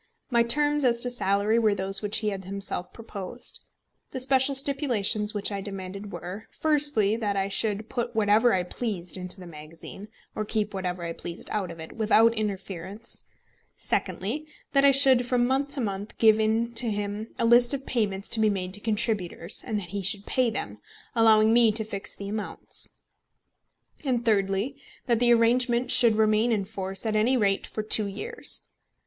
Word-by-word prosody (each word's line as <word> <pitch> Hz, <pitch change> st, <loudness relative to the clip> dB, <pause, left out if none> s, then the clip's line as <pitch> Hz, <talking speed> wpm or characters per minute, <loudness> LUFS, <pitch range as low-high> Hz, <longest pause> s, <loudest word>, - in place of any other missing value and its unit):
My 235 Hz, -1 st, +4 dB
terms 295 Hz, +5 st, +2 dB
as 240 Hz, -2 st, +3 dB
to 245 Hz, -, +4 dB
salary 210 Hz, -1 st, +1 dB
were 215 Hz, -3 st, +2 dB
those 195 Hz, 0 st, 0 dB
which 210 Hz, -1 st, 0 dB
he 215 Hz, -, -1 dB
had 195 Hz, -2 st, -6 dB
himself 195 Hz, -2 st, -4 dB
proposed. 230 Hz, +1 st, -5 dB, 0.5 s
The 260 Hz, -, -5 dB
special 265 Hz, +1 st, +3 dB
stipulations 245 Hz, -7 st, +2 dB
which 205 Hz, +1 st, -1 dB
I 200 Hz, -1 st, -3 dB
demanded 195 Hz, +1 st, -6 dB
were: 180 Hz, +5 st, -8 dB
firstly, 290 Hz, -9 st, +2 dB
that 205 Hz, -3 st, -2 dB
I 195 Hz, 0 st, -1 dB
should 210 Hz, +1 st, 0 dB
put 240 Hz, -1 st, -4 dB
whatever 220 Hz, +2 st, +3 dB
I 185 Hz, -3 st, +1 dB
pleased 180 Hz, -2 st, -4 dB
into 185 Hz, +1 st, -3 dB
the 180 Hz, -, -10 dB
magazine, 165 Hz, +5 st, -11 dB, 0.3 s
or 215 Hz, -, -2 dB
keep 210 Hz, 0 st, -1 dB
whatever 180 Hz, -2 st, -4 dB
I 170 Hz, 0 st, -4 dB
pleased 170 Hz, +1 st, -6 dB
out 200 Hz, -4 st, -2 dB
of 170 Hz, -1 st, -10 dB
it, 160 Hz, -, -9 dB
without 225 Hz, +1 st, +3 dB
interference; 200 Hz, -1 st, -4 dB, 0.5 s
secondly, 275 Hz, +11 st, -2 dB, 0.2 s
that 275 Hz, -1 st, +3 dB
I 280 Hz, -, +7 dB
should 265 Hz, -3 st, +4 dB
from 245 Hz, -1 st, +2 dB
month 265 Hz, +3 st, 0 dB
to 270 Hz, -, -2 dB
month 200 Hz, -1 st, -5 dB
give 220 Hz, -1 st, +5 dB
in 225 Hz, +2 st, 0 dB
to 235 Hz, 0 st, 0 dB
him 205 Hz, +1 st, -3 dB
a -, -, 0 dB
list 240 Hz, +1 st, +5 dB
of 275 Hz, -1 st, -2 dB
payments 205 Hz, -5 st, -1 dB
to 235 Hz, -, +1 dB
be 215 Hz, -1 st, +3 dB
made 185 Hz, -2 st, -3 dB
to 205 Hz, -, -6 dB
contributors, 210 Hz, -5 st, -1 dB
and 215 Hz, -3 st, -1 dB
that 180 Hz, -4 st, -7 dB
he 200 Hz, +2 st, -3 dB
should 200 Hz, +2 st, -2 dB
pay 255 Hz, -2 st, +1 dB
them, 225 Hz, -, -5 dB, 0.3 s
allowing 220 Hz, -2 st, +5 dB
me 235 Hz, -2 st, +5 dB
to 220 Hz, +1 st, -1 dB
fix 205 Hz, -1 st, -5 dB
the 200 Hz, -, -7 dB
amounts; 210 Hz, +1 st, -2 dB, 1.1 s
and 245 Hz, -4 st, -1 dB
thirdly, 205 Hz, +5 st, 0 dB, 0.2 s
that 235 Hz, -3 st, +1 dB
the 240 Hz, 0 st, +4 dB
arrangement 240 Hz, +1 st, +2 dB
should 230 Hz, -3 st, +6 dB
remain 215 Hz, +2 st, +2 dB
in 205 Hz, -4 st, 0 dB
force 195 Hz, -1 st, -5 dB
at 215 Hz, -1 st, -1 dB
any 235 Hz, +5 st, +2 dB
rate 200 Hz, -4 st, +1 dB
for 215 Hz, -, -5 dB
two 215 Hz, -1 st, +4 dB
years. 200 Hz, +1 st, -2 dB
215 Hz, 180 wpm, -26 LUFS, 195-240 Hz, 1.1 s, I